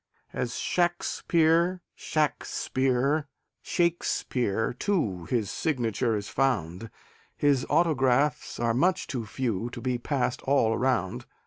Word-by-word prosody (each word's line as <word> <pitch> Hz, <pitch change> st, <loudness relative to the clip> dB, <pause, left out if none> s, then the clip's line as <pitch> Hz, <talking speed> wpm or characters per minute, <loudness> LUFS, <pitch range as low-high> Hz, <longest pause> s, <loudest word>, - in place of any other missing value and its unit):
As 120 Hz, -1 st, -2 dB
"Shaxpere," 175 Hz, 0 st, +1 dB
"Shakspere," 140 Hz, -1 st, 0 dB, 0.4 s
"Shaikspeare," 125 Hz, -, 0 dB
too, 110 Hz, -, 0 dB
His 110 Hz, 0 st, -1 dB
signature 120 Hz, -, 0 dB
is 100 Hz, -1 st, -4 dB
found; 110 Hz, -7 st, -1 dB, 0.5 s
His 140 Hz, -3 st, +2 dB
autographs 145 Hz, -3 st, +2 dB
are 115 Hz, -1 st, +1 dB
much 175 Hz, +9 st, +2 dB
too 120 Hz, -7 st, -4 dB
few 115 Hz, -2 st, -2 dB
To 120 Hz, -, -8 dB
be 125 Hz, 0 st, -1 dB
passed 125 Hz, -1 st, -1 dB
all 130 Hz, -5 st, +2 dB
around. 115 Hz, -8 st, 0 dB
130 Hz, 105 wpm, -27 LUFS, 115-155 Hz, 0.5 s, His